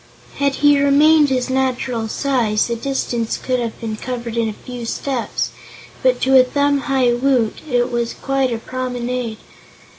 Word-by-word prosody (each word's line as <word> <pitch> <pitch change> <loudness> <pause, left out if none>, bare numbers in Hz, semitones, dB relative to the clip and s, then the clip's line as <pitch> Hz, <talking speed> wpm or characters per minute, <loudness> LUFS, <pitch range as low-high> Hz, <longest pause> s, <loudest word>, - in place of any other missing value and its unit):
Had 280 -1 +1
he 290 -1 +4
remained 295 +2 +5
his 255 -1 0
natural 255 -3 -1
size, 230 -4 0
the 235 - -2
distance 240 -2 -2
could 255 -1 -1
have 230 -2 -4
been 220 -2 -4
covered 240 -1 -5
in 230 -1 +1
a - - -5
few 245 -1 -6
steps, 245 +1 -2 0.5
but - - +2
to 265 +1 +3
a 260 - +8
thumb 285 +2 +1
high 260 -3 +3
Woot 245 -3 +1
it 245 -1 +1
was 235 -1 -2
quite 270 -2 0
a 230 - -1
promenade. 250 -1 -4
250 Hz, 160 wpm, -19 LUFS, 235-275 Hz, 0.5 s, a